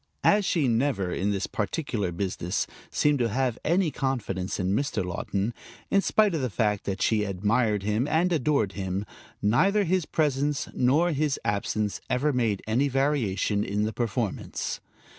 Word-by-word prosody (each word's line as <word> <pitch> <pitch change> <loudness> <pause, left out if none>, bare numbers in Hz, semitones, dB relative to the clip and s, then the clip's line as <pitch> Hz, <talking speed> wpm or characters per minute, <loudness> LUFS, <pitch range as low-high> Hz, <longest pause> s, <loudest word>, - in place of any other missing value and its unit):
As 205 -1 +4
she 160 -7 +2
never, 115 -6 +1
in 100 - 0
this 100 -2 0
particular 105 - -2
business, 90 0 -2 0.2
seemed 150 -2 +2
to 120 -2 +1
have 125 +1 0
any 170 0 +2
confidence 105 -10 -2
in 95 0 0
Mr. 135 -8 -1
Laughton, 100 +4 -2 0.4
in 195 - +4
spite 210 -1 +3
of 160 - -1
the 130 - -1
fact 105 -2 0
that 95 -1 -2
she 110 -2 +2
admired 105 +2 +1
him 105 +6 0
and 170 +4 +2
adored 145 - +1
him, 95 +1 -3 0.4
neither 190 - +3
his 185 -2 0
presence 145 -2 0
nor 150 +8 +3
his 150 -1 0
absence 105 0 -1
ever 145 +4 +1
made 115 -6 0
any 120 +6 +2
variation 125 -7 +1
in 105 +1 -1
the 110 +1 -1
performance. 115 -2 -2
120 Hz, 160 wpm, -27 LUFS, 100-145 Hz, 0.4 s, As